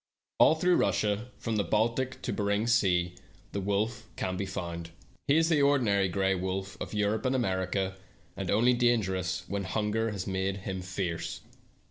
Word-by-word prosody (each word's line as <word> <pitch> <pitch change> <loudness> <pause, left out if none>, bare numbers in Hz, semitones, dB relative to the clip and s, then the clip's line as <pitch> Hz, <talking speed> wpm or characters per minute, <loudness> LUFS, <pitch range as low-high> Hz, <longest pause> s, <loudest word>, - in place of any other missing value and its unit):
All 160 - +7
through 180 +2 +3
Russia, 105 +2 +1
from 115 -2 -2
the 100 - +2
Baltic 115 +7 0
to - - -2
Behring's 105 +3 +1
sea, 90 -6 +2 0.4
the 100 - -2
wolf 110 +4 -1
can 95 - -2
be 95 +1 -3
found. 85 -2 -5 0.4
He 145 +2 +4
is 165 0 +4
the 155 -3 +3
ordinary 115 -9 +3
gray 95 +1 +1
wolf 95 +1 -3
of - - -5
Europe 105 +1 +1
and 130 +1 +1
America, 95 -3 -1 0.4
and 95 -2 -4
only 120 +5 +4
dangerous 95 -7 +1
when 100 0 -2
hunger 110 +4 0
has 100 -4 -4
made 95 0 -1
him 95 -2 -3
fierce. 90 -2 -3
100 Hz, 165 wpm, -29 LUFS, 95-115 Hz, 0.4 s, All